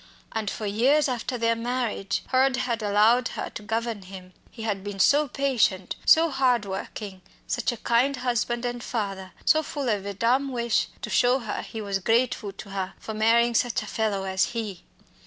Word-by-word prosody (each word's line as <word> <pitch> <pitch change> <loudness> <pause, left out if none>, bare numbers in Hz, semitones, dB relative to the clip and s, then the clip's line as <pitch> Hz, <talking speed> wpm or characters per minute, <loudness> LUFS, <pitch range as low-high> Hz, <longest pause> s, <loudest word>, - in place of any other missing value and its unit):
And 220 -2 -2
for 215 - -5
years 255 +9 +3
after 250 0 -2
their 230 0 +2
marriage 235 -4 -2
Hurd 260 0 +3
had 235 -2 -1
allowed 215 +4 +4
her - - -4
to - - -7
govern 225 0 -2
him. 185 -1 -11 0.2
He 225 - -9
had 200 -3 -2
been 205 -1 -5
so 290 +8 +4
patient, 245 -9 0
so 325 0 +6
hard 255 -5 +2
working, 195 0 -6 0.2
such 245 - -1
a 240 - -6
kind 245 +5 +2
husband 240 -1 -1
and 245 0 -3
father, 195 -5 -4
so 310 - +5
full 285 -4 -3
of 200 -2 -1
a 200 - -4
dumb 255 +6 +1
wish 235 -2 +1 0.2
to - - -4
show 250 +1 +4
her 225 -5 -4
he 220 - -7
was 200 -2 -2
grateful 225 0 +1
to 200 +1 -11
her 195 -1 -4
for 220 - -7
marrying 230 +2 +3
such 240 0 +1
a - - -8
fellow 210 -2 -1
as 190 +2 0
he. 205 -6 -4
230 Hz, 190 wpm, -26 LUFS, 205-250 Hz, 0.2 s, so